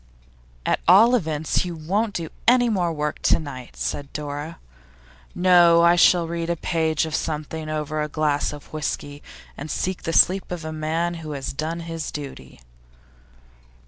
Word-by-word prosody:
'At - - +1
all 210 +8 +7
events, 160 -9 0
you 175 -2 -5
won't 200 +7 -1
do 165 -2 -3 0.2
any 245 0 +5
more 180 -6 0
work 150 -1 -3
to - - +3
night,' 130 -5 -8
said 140 -1 -4
Dora. 145 +2 -5 0.8
'No; 175 -2 +5
I 170 +1 +6
shall 175 -1 +4
read 170 0 -3
a 170 - +1
page 160 -2 0
of 160 - -6
something 155 +1 -3
or - - -2
other 155 - -1
over 155 +1 -3
a 150 - -1
glass 150 -1 0
of 145 0 -12
whisky, 145 -1 -4 0.3
and 150 +3 -7
seek 185 +3 -2
the 165 - -3
sleep 185 +4 +4
of 170 -3 -5
a 160 - -5
man 160 +3 -1
who 155 -1 -6
has 135 -2 -5
done 160 +4 -3
his 165 -1 -5
duty. 135 - -9
160 Hz, 175 wpm, -23 LUFS, 150-175 Hz, 0.8 s, all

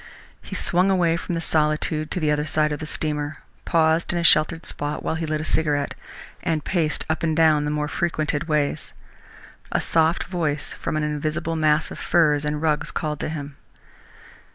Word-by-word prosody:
He - - -8
swung 180 +2 +2
away 175 -3 +3
from 170 +1 -3
the 165 - -2
solitude 155 -1 +1
to 180 - -2
the 155 -3 +1
other 150 +1 0
side 150 0 +1
of 150 - -3
the 155 - -6
steamer, 150 -1 -3 0.2
paused 160 0 +2
in 175 - -1
a 170 - 0
sheltered 160 +1 +4
spot 145 +1 -3
while - - -1
he 160 0 -3
lit 155 0 -1
a - - -4
cigarette, 145 -3 +1 0.5
and 155 -3 -1
paced 165 -5 0
up 160 - -1
and 160 -1 0
down 155 -2 +4
the - - -1
more 150 0 -1
frequented 155 -1 -1
ways. 150 -2 -1 0.8
A - - +2
soft 160 +1 +2
voice 155 -5 -2
from - - -3
an 155 - 0
invisible 155 +2 -2
mass 155 0 +2
of - - -7
furs 150 -4 +2
and 150 +1 -2
rugs, 155 0 +1
called 150 -2 -3
to - - -3
him. 145 -3 -6
155 Hz, 190 wpm, -23 LUFS, 150-165 Hz, 0.8 s, sheltered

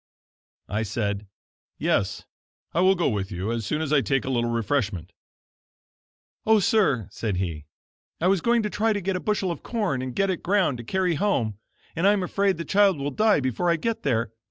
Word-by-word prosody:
I 105 +3 -1
said: 105 -1 -2 0.5
"Yes, - - 0 0.5
I 170 - +2
will 190 +1 +5
go 175 - +1
with 100 -6 -2
you 95 +4 -3
as 115 -3 -3
soon 150 +6 -1
as 155 -1 -1
I 145 - +5
take 135 0 0
a 135 - -2
little 120 -2 0
refreshment." 110 - -1 1.3
"Oh, 220 0 +5
sir," 175 - +2
said 105 -5 -2
he, 85 -5 -3 0.5
"I 170 - -1
was 190 -1 +3
going 235 +2 +2
to 210 - -1
try 220 +1 +1
to 205 - -1
get 190 +1 -1
a - - -1
bushel 195 -3 -1
of 170 - -6
corn, 205 - -1
and 130 -1 -5
get 195 -1 +2
it 180 - -4
ground 180 -9 +1
to - - -6
carry 185 +6 0
home, 115 - 0 0.4
and 170 +4 +2
I 205 - +6
am 200 -3 0
afraid 195 0 +1
the 170 - -5
child 200 -3 +4
will 140 +1 -3
die 215 -4 +3
before 130 +7 0
I 170 - +4
get 225 +7 -2
there. 115 -5 0
155 Hz, 205 wpm, -25 LUFS, -, 1.3 s, I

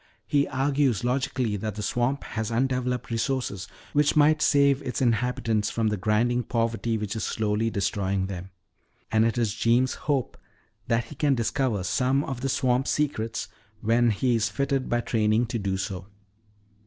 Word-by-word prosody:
He 145 -1 +2
argues 135 -3 +1
logically 125 -3 0
that 110 0 -4
the 105 - -4
swamp 125 +5 0
has 110 -1 -4
undeveloped 125 0 -1
resources 115 -4 -2 0.3
which 145 0 +3
might 155 +1 +4
save 140 -2 +4
its 125 -3 -3
inhabitants 115 -3 +1
from 115 -2 0
the 105 - 0
grinding 115 +5 +1
poverty 115 -1 -1
which 105 0 -4
is 110 - -3
slowly 110 +1 0
destroying 100 -2 -1
them. 95 -1 -6 0.6
And 110 0 +4
it 115 +1 0
is 115 -4 +1
Jeems' 120 +3 +2 0.2
hope 135 -4 0 0.5
that 115 0 +1
he 115 - -11
can 145 -1 +1
discover 115 -3 0
some 130 +7 +1
of 135 -4 -5
the 135 - -1
swamp 130 0 +1
secrets 115 -7 -1 0.3
when 115 +2 +3
he 120 +3 +1
is 110 -1 +1
fitted 140 -1 -1
by 120 0 +1
training 110 0 +1
to 115 0 -3
do 95 -2 -1
so." 95 -1 -5
120 Hz, 165 wpm, -26 LUFS, 110-130 Hz, 0.6 s, might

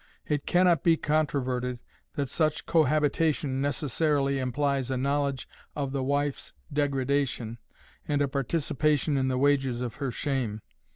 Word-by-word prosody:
It 145 -2 -2
can 180 +1 +4
not 170 -5 +4
be 165 -1 +4
controverted 130 -5 0 0.4
that 140 -3 -1
such 155 +3 0
cohabitation 150 -2 +2
necessarily 140 0 0
implies 135 0 0
a 130 - -1
knowledge 140 0 -1 0.3
of 140 -2 -2
the 135 -1 -1
wife's 140 +1 -1 0.2
degradation, 135 -4 0 0.5
and 145 -1 +1
a 145 - +2
participation 145 +1 0
in 130 -1 +1
the 130 -1 0
wages 135 -3 +2
of 125 0 -4
her 140 -2 -2
shame. 120 -5 -2
140 Hz, 135 wpm, -28 LUFS, 130-150 Hz, 0.5 s, can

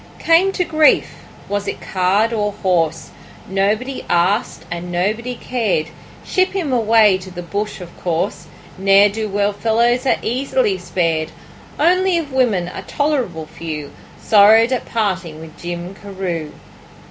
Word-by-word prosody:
Came 340 +4 +3
to 365 - 0
grief 315 -2 +3 0.3
was 205 0 -3
it - - -4
card 195 +4 +1
or 210 -2 -1
horse? 165 -4 0 0.4
Nobody 210 +7 -1
asked 190 +7 +1
and 175 +1 -5
nobody 215 +8 -1
cared; 220 -12 -1 0.4
Ship 370 0 +1
him 335 -9 -2
away 220 -4 +4
to 185 0 -10
the 175 -1 -7
bush 205 +5 -4
of 175 -1 -11
course, 170 -1 -2 0.3
Ne'er 195 +1 +5
do 215 +1 -4
well 205 +1 0
fellows 235 +5 +1
are - - +3
easily 250 -5 0
spared; 165 -3 -1 0.5
Only 365 +3 +3
of 295 -5 -4
women 225 -9 +1
a 180 - -7
tolerable 255 - -2
few 155 -2 -7 0.3
Sorrowed 220 +3 +5
at 255 - -1
parting 185 -8 -2
with 160 0 -11
Jim 175 +1 -6
Carew. 185 -6 -5
205 Hz, 140 wpm, -18 LUFS, 175-245 Hz, 0.5 s, Ne'er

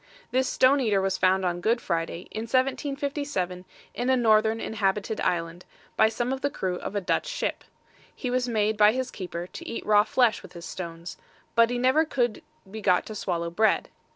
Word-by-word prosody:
This 260 +1 +1
stone 265 +2 +4
eater 215 -6 +2
was 190 0 -1
found 190 0 +3
on 175 0 -1
Good 230 +5 +2
Friday, 170 -2 -2
in 220 +1 -4
1757, 270 - -1 0.3
in 245 +1 -2
a 260 - +4
northern 220 -1 +3
inhabited 210 0 -1
island, 170 0 -1 0.3
by 220 - +5
some 240 +3 -2
of 265 - -5
the 285 - +1
crew 185 -8 -3
of 200 - -6
a 205 - 0
Dutch 180 - 0
ship. - - -3 0.5
He 250 - -3
was 250 0 0
made 215 -1 +1
by 210 0 +6
his 260 0 -3
keeper 175 -3 -5
to - - -8
eat - - -5
raw 210 -1 +5
flesh 230 0 +2
with - - -13
his 170 0 -9
stones; 170 -1 -7 0.4
but 230 0 +5
he 245 - -1
never 260 +6 +4
could 245 -8 -1 0.3
be 220 +1 -6
got 185 -3 +3
to 215 - -7
swallow 170 -4 -2
bread. 220 +5 +2
215 Hz, 195 wpm, -26 LUFS, 185-250 Hz, 0.5 s, by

